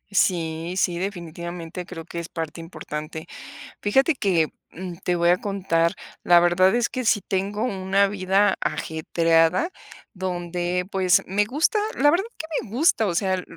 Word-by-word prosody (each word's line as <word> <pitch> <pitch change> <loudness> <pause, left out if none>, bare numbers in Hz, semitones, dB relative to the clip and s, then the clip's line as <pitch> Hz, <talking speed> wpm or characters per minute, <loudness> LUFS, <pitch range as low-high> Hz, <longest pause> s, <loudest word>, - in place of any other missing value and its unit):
Sí, 165 -1 +1
sí, 175 -3 +1
definitivamente 175 -2 -5
creo 165 -3 -8
que 170 - -6
es 170 - -6
parte 165 0 -5
importante. 160 -1 -7 0.6
Fíjate 270 +10 +3
que, 180 - +1 0.2
mm, 180 0 -7
te 180 - 0
voy 170 0 +3
a 180 - +4
contar, 180 -5 0 0.3
la 175 -1 +6
verdad 175 +3 +4
es 240 0 +1
que 255 -3 -3
sí 205 -3 +3
tengo 200 +3 -1
una 195 -3 +1
vida 195 0 +2
ajetreada 165 - +1 0.4
donde, 180 -1 -2
pues 185 -2 +3
me 205 +2 +1
gusta, 300 - +1 0.2
la 290 +2 +5
verdad 350 +5 +1
que 320 - -6 0.2
me 215 - -12
gusta. 260 -7 +3
O 175 - -1
sea, 185 +1 0
180 Hz, 155 wpm, -24 LUFS, 170-200 Hz, 0.6 s, la